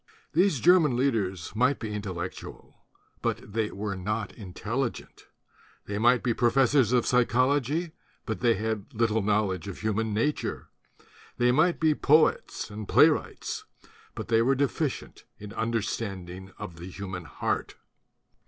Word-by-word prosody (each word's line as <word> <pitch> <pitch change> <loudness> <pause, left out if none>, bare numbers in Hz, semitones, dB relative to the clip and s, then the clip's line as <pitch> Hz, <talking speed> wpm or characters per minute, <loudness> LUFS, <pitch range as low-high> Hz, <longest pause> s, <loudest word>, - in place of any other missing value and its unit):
These 175 -4 +3
German 165 -8 +5
leaders 105 - -1
might 125 +5 +3
be 110 -2 -5
intellectual; 95 -5 -7 0.4
but 105 - -3
they 110 -1 0
were 100 0 -4
not 105 +3 -3
intelligent. 115 +5 -5 0.6
They 100 0 -3
might 120 +2 +4
be 120 - +1
professors 130 +2 +3
of 125 -2 +3
psychology; 130 +6 +2 0.3
but 110 -5 -3
they 115 +3 +3
had 110 +3 -4
little 110 -1 +2
knowledge 100 -3 0
of 100 - -7
human 110 0 -1
nature. 115 +8 -2 0.7
They 125 0 +3
might 160 +7 +3
be 160 -1 +4
poets 150 -6 +2
and 105 0 -7
playwrights; - - +2 0.5
but - - -6
they 115 -1 +3
were 135 +4 +3
deficient 140 +1 -2
in 105 0 -9
understanding 100 -5 -3
of 85 - -8
the 85 +3 -8
human 95 -2 -6
heart. 70 - -3
110 Hz, 135 wpm, -27 LUFS, 100-130 Hz, 0.7 s, German